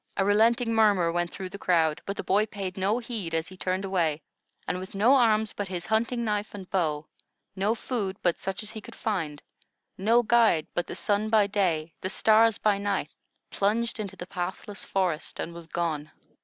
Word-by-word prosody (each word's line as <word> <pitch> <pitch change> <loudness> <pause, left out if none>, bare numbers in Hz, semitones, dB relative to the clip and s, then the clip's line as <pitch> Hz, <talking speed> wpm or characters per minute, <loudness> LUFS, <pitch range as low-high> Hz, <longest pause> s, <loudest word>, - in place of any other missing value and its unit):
A 195 - +2
relenting 230 +3 +3
murmur 205 -6 +4
went 175 0 -1
through 185 +1 -7
the 200 - -9
crowd, 165 -5 +2
but 200 - -3
the - - -3
boy 210 +3 +2
paid 195 -3 -5
no 195 +4 +1
heed, 225 -9 -4
as 160 +2 -1
he 185 - -11
turned 185 +1 -2
away, 165 -6 0 0.4
and 180 - -1
with 190 +2 -9
no 220 +7 +5
arms 220 -5 +3
but 205 - -4
his 180 -2 -4
hunting 230 +3 0
knife 210 -1 -2
and 190 -3 -8
bow, 155 -5 0 0.5
no 200 +4 +1
food 205 -6 -3
but 175 -2 +2
such 195 +3 -3
as 215 - -5
he 220 - -7
could - - -12
find, 165 -9 -3 0.6
no 230 +5 +4
guide 225 -9 +4
but 175 - -1
the - - -6
sun 210 +1 0
by 215 -2 +5
day, 175 -6 0
the 185 - -2
stars 220 +2 +4
by 205 -2 +2
night, 200 0 -1 0.4
plunged 225 +3 0
into 200 -3 -5
the 175 - -7
pathless 185 +2 -5
forest 180 -5 -2
and 170 - -4
was 170 -1 -10
gone. 160 -3 -2
195 Hz, 195 wpm, -27 LUFS, 175-215 Hz, 0.6 s, no